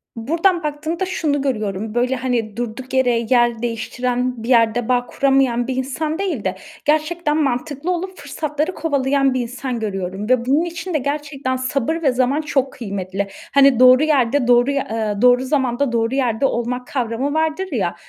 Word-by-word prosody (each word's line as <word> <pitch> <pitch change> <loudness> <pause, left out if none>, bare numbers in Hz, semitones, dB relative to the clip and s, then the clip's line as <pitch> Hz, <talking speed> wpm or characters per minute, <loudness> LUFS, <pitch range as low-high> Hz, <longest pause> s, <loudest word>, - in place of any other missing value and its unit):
Buradan 335 +9 +1
baktığımda, 310 +5 -2
şunu 300 -6 -1
görüyorum, 215 -4 -2
böyle, 250 +2 +1
hani, 235 -4 -2
durduk 245 +2 -5
yere 245 -3 +2
yer 240 -2 +3
değiştiren, 245 +1 -2
bir 240 - -5
yerde 230 -1 +3
bağ 245 -1 +2
kuramayan 265 -3 +1
bir 260 - -2
insan 300 +6 -2
değil 345 - -2
de 190 0 -1 0.3
gerçekten 310 +1 +1
mantıklı 285 +5 -2
olup 370 +1 -4
fırsatları 300 +4 -3
kovalayan 275 -3 +1
bir 255 - 0
insan 245 +1 -4
görüyorum 195 -1 -4
ve 255 -2 +3
bunun 290 +6 +2
için 340 +1 -5
de - - +3
gerçekten 280 -1 -3
sabır 275 +5 -1
ve 275 -5 +3
zaman 255 +4 +1
çok 275 -3 -1
kıymetli. 195 -3 -4 0.3
Hani, 275 -3 +5
doğru 255 +2 +7
yerde 280 -4 +2
doğruy 245 +3 +4
eee, 220 -5 -1
doğru 250 +1 +5
zamanda, 265 -1 0
doğru 230 +2 0
yerde 250 -1 +1
olmak 250 0 -2
kavramı 255 +2 -2
vardır, 320 +4 0
ya. - - -1
260 Hz, 165 wpm, -20 LUFS, 240-295 Hz, 0.3 s, doğru